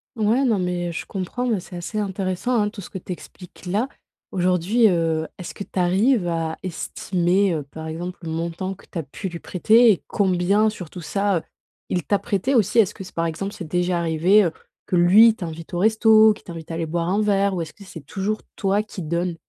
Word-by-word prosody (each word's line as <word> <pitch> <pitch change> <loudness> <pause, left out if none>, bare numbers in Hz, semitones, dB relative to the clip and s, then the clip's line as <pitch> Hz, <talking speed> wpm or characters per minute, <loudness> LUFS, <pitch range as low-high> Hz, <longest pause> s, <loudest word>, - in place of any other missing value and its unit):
Ouais, 225 +5 +2
non, 225 -6 +2
mais, 180 -1 -1
heu, - - -4
je 165 - -6
comprends, 200 +6 -3
mais 225 -5 +1
c'est 180 0 -11
assez 175 +5 -5
intéressant, 195 +3 -2
hein, 210 - +1
tout 205 -1 -9
ce - - -11
que 190 - -5
tu 180 - -9
expliques, 180 +1 -10
là. 205 +8 0 0.4
Aujourd'hui, 185 +5 +2
heu, 165 -3 +1
est-ce 180 - -7
que - - -5
tu 190 - -5
arrives 195 +4 +3
à 165 -1 -1
estimer, 185 +1 0
heu, 150 - -3
par 160 +3 -9
exemple, 175 +3 -5
le 165 - -6
montant 170 +4 -3
que - - -19
tu 170 - -3
as - - -1
pu 145 +7 -6
lui 170 -2 -6
prêter 225 +8 +4
et 190 - -1
combien 195 +2 +2
sur 180 -7 -8
tout 180 - -8
ça, 200 +3 0
heu, - - -2 0.5
il 180 -2 -1
t'a 205 - +1
prêté 205 +4 -1
aussi? 230 -3 +2
Est-ce 210 -3 +5
que 195 - -8
c'est 185 - -13
par 165 - 0
exemple, 180 +5 -3
c'est 175 - -7
déjà 180 +1 0
arrivé, 170 +5 +4
heu, 170 - +1 0.3
que - - -1
lui 200 +6 +7
t'invite 165 -3 -7
au 175 - -1
resto, 220 +1 +6
qu'il 210 - -16
t'invite 165 -3 -9
à 165 - -4
aller 165 0 -2
boire 170 +2 -2
un 200 +3 +1
verre, 200 -1 +2
ou 170 - -1
est-ce 155 - -10
que 205 - -14
c'est 165 -7 -11
toujours 205 +5 -2
toi 200 +1 +1
qui 210 -3 -8
donnes? 170 +2 -2
185 Hz, 230 wpm, -22 LUFS, 170-205 Hz, 0.5 s, lui